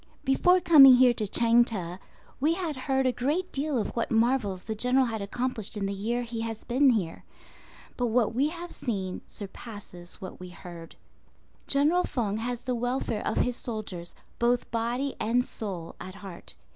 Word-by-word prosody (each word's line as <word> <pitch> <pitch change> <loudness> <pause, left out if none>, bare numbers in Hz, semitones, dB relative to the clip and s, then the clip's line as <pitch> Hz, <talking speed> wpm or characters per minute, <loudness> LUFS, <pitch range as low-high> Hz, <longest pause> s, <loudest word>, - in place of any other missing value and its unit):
Before 355 +7 +4
coming 285 -7 +9
here 250 -1 +6
to 215 -3 -2
Chang 235 +3 +4
teh, 180 -7 -4 0.4
we 310 +5 +2
had 340 -5 -3
heard 265 0 0
a 255 - +4
great 295 +10 -1
deal 285 0 -1
of 220 - -2
what 235 - -1
marvels 225 -5 +1
the 220 - -3
General 250 +4 +2
had 225 -3 -3
accomplished 225 0 -3
in 200 - -1
the 195 - -2
year 230 +5 -2
he 230 -1 -5
has 225 -1 -5
been 260 +3 +3
here; 195 -9 -1 0.7
but 245 - +1
what 230 -1 +2
we 270 +5 +2
have 345 +2 -7
seen 190 -6 -4
surpasses 200 -4 -9
what 185 - -8
we 180 0 -8
heard. 175 -2 -11 0.7
General 300 +6 +3
Feng 215 -5 -1
has 240 +1 -4
the 250 - -1
welfare 245 -2 -1
of 220 - -1
his 250 - +1
soldiers, 210 -8 -5 0.2
both 240 +1 +1
body 240 +4 -1
and 245 +3 +2
soul, 185 -10 -4
at 185 +1 -8
heart. 195 -3 -8
235 Hz, 175 wpm, -28 LUFS, 205-260 Hz, 0.7 s, coming